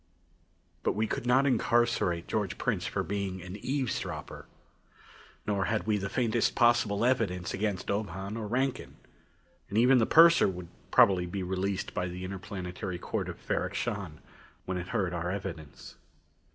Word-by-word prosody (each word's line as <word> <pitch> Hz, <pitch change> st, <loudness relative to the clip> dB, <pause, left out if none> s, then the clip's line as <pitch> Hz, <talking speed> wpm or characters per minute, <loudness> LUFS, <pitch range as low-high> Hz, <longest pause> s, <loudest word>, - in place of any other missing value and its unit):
But -, -, +1 dB
we 110 Hz, +1 st, +1 dB
could 115 Hz, -, -3 dB
not 130 Hz, +3 st, +4 dB
incarcerate 115 Hz, -9 st, +2 dB
George 105 Hz, -4 st, -2 dB
Prince -, -, -1 dB
for -, -, -1 dB
being 100 Hz, 0 st, -3 dB
an 90 Hz, +1 st, -7 dB
eavesdropper. 130 Hz, +2 st, -3 dB, 1.0 s
Nor 100 Hz, -1 st, 0 dB
had 110 Hz, -1 st, -1 dB
we 110 Hz, -1 st, +2 dB
the 100 Hz, 0 st, -3 dB
faintest 120 Hz, -2 st, +1 dB
possible 120 Hz, -3 st, +3 dB
evidence 100 Hz, -8 st, 0 dB
against 100 Hz, -2 st, -2 dB
Ob 105 Hz, 0 st, -1 dB
Hahn 95 Hz, +4 st, -5 dB
or 110 Hz, -2 st, -4 dB
Rankin. 130 Hz, +4 st, -1 dB, 0.7 s
And 100 Hz, -, -2 dB
even 125 Hz, +3 st, +6 dB
the 110 Hz, -, +2 dB
purser 170 Hz, +1 st, +7 dB
would 90 Hz, -2 st, -5 dB, 0.2 s
probably 90 Hz, -3 st, +5 dB
be 95 Hz, +2 st, -3 dB
released 95 Hz, +1 st, -2 dB
by 90 Hz, -, -1 dB
the 90 Hz, +1 st, -6 dB
Interplanetary 90 Hz, 0 st, -5 dB
Court -, -, -3 dB
of -, -, -7 dB
Ferrok -, -, -2 dB
Shahn 100 Hz, -10 st, -3 dB, 0.4 s
when 95 Hz, -1 st, -2 dB
it 90 Hz, -, -6 dB
heard 90 Hz, -2 st, -1 dB
our 85 Hz, 0 st, -2 dB
evidence. 90 Hz, -6 st, -7 dB
100 Hz, 155 wpm, -30 LUFS, 90-115 Hz, 1.0 s, purser